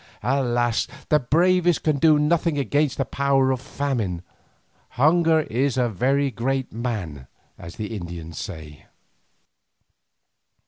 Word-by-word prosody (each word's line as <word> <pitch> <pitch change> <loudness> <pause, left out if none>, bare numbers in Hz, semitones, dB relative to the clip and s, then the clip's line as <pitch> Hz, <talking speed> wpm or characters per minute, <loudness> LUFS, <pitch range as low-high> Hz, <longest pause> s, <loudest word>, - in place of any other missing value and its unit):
Alas! 120 -3 +1 0.2
the 150 - +4
bravest 175 +5 +2
can 150 -3 +1
do 155 +1 +5
nothing 155 +1 +1
against 145 0 0
the 135 - 0
power 135 -1 +1
of 130 -1 -2
famine. 115 -13 -3 0.7
Hunger 160 +3 +4
is 135 0 -1
a 125 -2 +2
very 135 +6 +1
great 130 +3 -2
man, 100 - -4 0.3
as 85 +1 -11
the 110 +1 -5
Indians 85 -3 -7
say. 80 -5 -9
130 Hz, 120 wpm, -23 LUFS, 110-150 Hz, 0.7 s, do